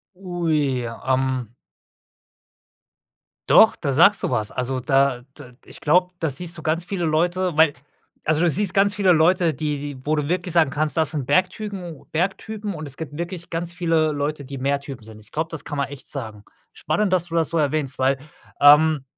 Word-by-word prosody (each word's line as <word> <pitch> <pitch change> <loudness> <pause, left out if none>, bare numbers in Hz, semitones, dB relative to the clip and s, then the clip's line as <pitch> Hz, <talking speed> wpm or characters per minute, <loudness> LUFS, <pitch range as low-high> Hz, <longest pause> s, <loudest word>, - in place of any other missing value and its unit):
Ui, 160 -8 -1
ähm. 130 0 -2 1.9
Doch, - - +6
da 140 - -2
sagst 175 +9 +5
du 185 - -1
was. 105 -2 -1
Also, 130 +1 -3
da 135 -1 +2 0.2
d 125 -4 -12
ich - - -11
glaube, 180 +4 +3
da 160 -3 -1
siehst 170 +5 -3
du 160 - -9
ganz 165 +2 -1
viele 180 -1 -3
Leute, 175 +2 0
weil 155 -2 +5 0.5
also, 155 0 +1
du 175 - +3
siehst 190 +3 +2
ganz 200 +1 +3
viele 190 -2 +3
Leute, 165 +1 +3
die 150 -2 -3
die 140 -2 -8
wo 155 +1 +1
du 150 0 -2
wirklich 180 -1 -2
sagen 160 -5 +4
kannst, 150 +3 -1
das 160 -2 +1
sind 145 -5 -4
Bergtypen, 185 +5 0
u 140 - -19
Bergtypen 200 +4 -3
und 155 -2 -7
es 140 -1 -9
gibt 155 -2 -7
wirklich 170 0 -6
ganz 165 +1 -3
viele 165 -3 +1
Leute, 145 0 -3
die 140 +1 -7
Meertypen 140 -2 -3
sind. 110 -1 -12
Ich 105 - -16
glaube, 160 +2 -2
das 165 - -5
kann 145 - -5
man 140 -1 -1
echt 140 -1 -10
sagen. 110 -7 -7 0.3
Spannend, 205 -3 -1
dass 175 -2 +2
du 165 - -8
das 165 -2 +1
so 165 - 0
erwähnst, 145 -3 -1
weil, 130 +1 +2 0.4
ähm, 150 0 +6
155 Hz, 195 wpm, -22 LUFS, 140-175 Hz, 1.9 s, Doch